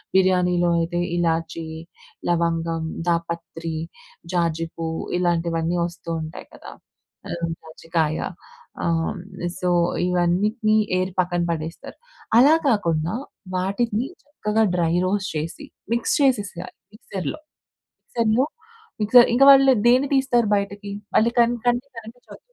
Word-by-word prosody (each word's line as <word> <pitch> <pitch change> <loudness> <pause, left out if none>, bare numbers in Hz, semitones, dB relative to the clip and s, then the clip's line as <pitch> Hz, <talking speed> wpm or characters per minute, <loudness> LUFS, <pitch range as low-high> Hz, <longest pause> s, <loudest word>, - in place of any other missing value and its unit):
బిర్యానీలో 180 -2 +3
అయితే 170 +1 -1 0.2
ఇలాచి, 165 -1 -1 0.7
లవంగం, 165 -1 0 0.2
దాపత్రి, 170 -1 -2 0.6
జాజి 165 -2 0
పువ్వు 160 -1 -3 0.2
ఇలాంటివన్నీ 170 -1 0
వస్తూ 170 -1 -8
ఉంటాయి 155 +2 -8
కదా! - - -11 0.6
ఆహ్, 170 0 -3
జాజికాయ 160 -1 -2 0.7
ఆహ్, 165 -1 +1
హ్మ్, 180 - -8 0.4
సో 180 - 0 0.4
ఇవన్నిటిని 205 +5 +2 0.2
ఏరీ 185 0 -1
పక్కన 175 -1 -1
పడేస్తారు. 160 0 -6 0.4
అలా 290 +6 +7
కాకుండా 170 -7 0 0.4
వాటిని 210 +5 -1 0.2
చక్కగా 220 -7 0
డ్రై 170 -2 +1
రోస్ట్ 195 +1 -1
చేసి 155 +2 -5 0.3
మిక్స్ 235 - +1
చేసేయాలి 205 -9 0 0.2
మిక్సర్‌లో. 195 - -5 0.7
మిక్సర్‌లో 230 +3 +1 0.5
మిక్సర్ 235 +3 +7
ఇంక 245 +3 +3
వాళ్ళు 270 -1 +7
దేన్ని 255 +3 +4
తీస్తారు 265 -4 +2
బయటకి? 200 0 -4 0.3
అల్లి 230 +2 +3
కన్ 235 0 +5
కంటికి 245 +3 0
కనిపించవు. 230 +2 -12
180 Hz, 110 wpm, -23 LUFS, 165-220 Hz, 0.7 s, అలా